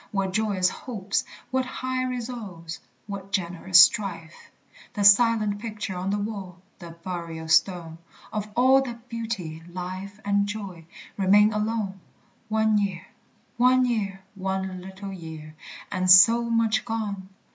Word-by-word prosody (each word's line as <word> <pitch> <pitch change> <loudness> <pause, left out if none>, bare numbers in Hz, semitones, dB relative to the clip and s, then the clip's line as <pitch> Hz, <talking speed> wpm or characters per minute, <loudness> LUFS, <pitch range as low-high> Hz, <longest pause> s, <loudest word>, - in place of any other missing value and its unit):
What 195 -2 -2
joyous 200 -3 +1
hopes, 200 -1 -3 0.3
what 260 0 +1
high 255 0 -3
resolves, 230 -10 -6 0.3
What 195 -1 -7
generous 180 -1 +3
strife! 175 -4 +3 0.5
The 205 - -1
silent 210 0 +5
picture 215 -3 -5
on 180 +2 -3
the 205 - 0
wall, 200 -4 -5 0.2
The 170 -2 -11
burial 170 -3 -5
stone, 165 0 +1 0.3
Of 210 -1 -3
all 260 +2 +5
that 240 -2 -8
beauty, 220 -9 -5
life, 185 +3 -6
and 200 0 +2
joy, 195 -6 -7 0.3
Remain 205 +2 +5
alone! 210 -2 -2 0.5
One 220 -1 +2
year, 190 -3 -3 0.5
one 255 +1 +4
year, 200 -5 -2
one 190 -1 -3
little 190 +1 -8
year, 160 -3 -9 0.4
And 185 -1 -1
so 230 +6 +7
much 230 -1 +2
gone! 205 -5 -4
200 Hz, 130 wpm, -25 LUFS, 185-220 Hz, 0.5 s, so